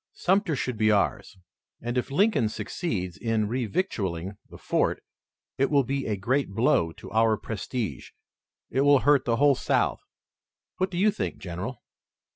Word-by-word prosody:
Sumter 190 -3 +1
should 125 -3 -3
be 110 0 +4
ours, 100 -1 0 0.4
and 120 +1 -4
if 125 - -1
Lincoln 150 - +2
succeeds 105 - -4
in 115 -2 0
revictualling 105 - -2
the - - -11
fort - - 0 0.6
it 135 - +3
will 140 -2 +4
be 135 +2 -2
a 105 -2 -1
great 130 +7 0
blow 100 -8 +3
to - - -12
our 110 0 +3
prestige. 110 - -4 0.6
It 135 - +1
will 145 -1 +5
hurt 145 -1 +4
the 115 - +2
whole 145 +3 +5
South. - - 0 0.8
What 185 +1 0
do 175 - -5
you 210 +4 +4
think, 90 - -4
General?" 95 +7 -6
120 Hz, 155 wpm, -26 LUFS, 105-140 Hz, 0.8 s, will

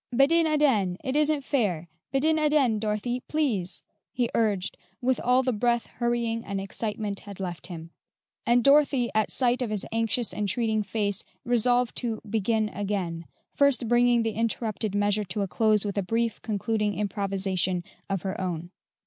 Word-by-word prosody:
"Bedin 305 +7 +4
aden; 260 - +2
it 260 +1 -2
isn't 300 -1 +2
fair; 195 - 0 0.2
bedin 310 +4 +2
aden, 295 -8 +3
Dorothy, 215 +3 -1
please," 240 - -1 0.3
he 245 -2 -1
urged 205 -4 0 0.2
with 260 -1 +1
all 250 +2 +3
the 255 -1 0
breath 235 +2 +1
hurrying 235 -1 -1
and 200 -2 -3
excitement 205 0 -3
had 200 -2 -11
left 175 -2 -4
him; 165 -2 -8 0.5
and 240 0 +3
Dorothy, 275 -3 +4
at 215 0 +2
sight 250 -1 +1
of 245 - -1
his 210 -2 -1
anxious, 225 +1 0
entreating 215 +2 0
face, 205 -2 -1 0.2
resolved 245 0 +2
to 230 -3 -2
"begin 220 +1 0
again," 190 -6 -3 0.3
first 280 -4 +2
bringing 240 0 +4
the 225 - 0
interrupted 220 -1 -2
measure 205 +1 +2
to 190 +3 -3
a - - -2
close 215 +1 +2
with 200 0 -1
a - - +1
brief 225 +4 -1
concluding 210 -1 -1
improvisation 195 -3 0 0.3
of 195 -3 -2
her 190 0 -3
own. 175 -1 -4
220 Hz, 155 wpm, -26 LUFS, 200-245 Hz, 0.5 s, Bedin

